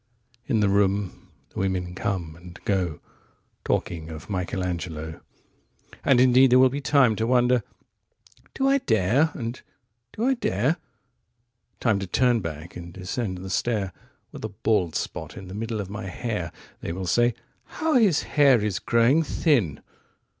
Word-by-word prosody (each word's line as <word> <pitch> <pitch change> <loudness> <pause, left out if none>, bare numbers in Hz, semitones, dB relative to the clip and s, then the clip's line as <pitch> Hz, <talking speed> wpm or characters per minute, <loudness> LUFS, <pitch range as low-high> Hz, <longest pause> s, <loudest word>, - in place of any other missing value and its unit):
35In 115 -5 +2
the 100 - +3
room 100 -1 0 0.2
the - - -6
women 90 -2 -1
come 90 -4 -3
and 90 0 -13
go36Talking 85 -2 -4
of 80 +5 -8
Michelangelo.37And 90 - -3
indeed 130 +1 +6
there 125 - +6
will 130 0 +6
be 140 +2 -3
time38To 125 -6 +3
wonder, 125 -1 +3 0.9
"Do 270 - +1
I 275 +1 +4
dare?" 115 - +2
and, 120 -1 -5 0.5
"Do 220 - -4
I 265 - +4
dare?"39Time 120 - -3
to 95 - -4
turn 120 +5 +3
back 85 -3 -7
and 85 -1 -8
descend 95 +2 -4
the 95 +1 -7
stair,40With 100 -4 -4
a 110 - -3
bald 100 -4 0
spot - - -4
in 95 - -8
the 95 - -8
middle 110 +1 -3
of 100 -1 -5
my 105 -1 -5
hair 95 -3 -3 0.3
41(They - - -4
will 95 +1 -4
say: 120 +6 +2 0.3
'How 320 0 -2
his 210 - +4
hair 140 -5 +4
is 100 -4 -1
growing 120 +7 +3
thin!") 125 - +1
110 Hz, 140 wpm, -25 LUFS, 90-125 Hz, 0.9 s, indeed